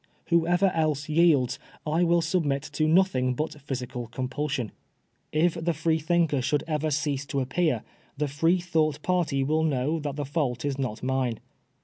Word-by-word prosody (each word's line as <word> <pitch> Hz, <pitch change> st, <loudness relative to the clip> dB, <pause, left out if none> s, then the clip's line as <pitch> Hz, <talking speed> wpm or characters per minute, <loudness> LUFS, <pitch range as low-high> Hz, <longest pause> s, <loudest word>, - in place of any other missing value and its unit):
Whoever 175 Hz, +3 st, +3 dB
else 155 Hz, -2 st, 0 dB
yields, 150 Hz, -6 st, +3 dB, 0.3 s
I 160 Hz, +2 st, +1 dB
wiU 170 Hz, -1 st, +3 dB
submit 155 Hz, -5 st, 0 dB
to 155 Hz, +1 st, +1 dB
nothing 155 Hz, -8 st, +3 dB
but 150 Hz, +1 st, -4 dB
physical 125 Hz, -3 st, -5 dB
compulsion. 130 Hz, -1 st, -3 dB, 0.6 s
If 160 Hz, +2 st, +3 dB
the 170 Hz, -1 st, 0 dB
Freethinker 160 Hz, -1 st, +1 dB
should 145 Hz, +3 st, 0 dB
ever 155 Hz, -1 st, -1 dB
cease 145 Hz, -1 st, -1 dB
to 140 Hz, -, -1 dB
appear, 135 Hz, -2 st, 0 dB, 0.3 s
the 150 Hz, -, 0 dB
Freethouffht 160 Hz, +1 st, +1 dB
party 165 Hz, -7 st, +1 dB
wiU 155 Hz, +3 st, +1 dB
know 145 Hz, +3 st, 0 dB
that 145 Hz, -2 st, -4 dB
the 145 Hz, -1 st, -3 dB
fault 140 Hz, -3 st, -1 dB
is 140 Hz, -1 st, -2 dB
not 125 Hz, -4 st, -3 dB
mine. 130 Hz, -3 st, 0 dB
150 Hz, 150 wpm, -27 LUFS, 135-165 Hz, 0.6 s, Whoever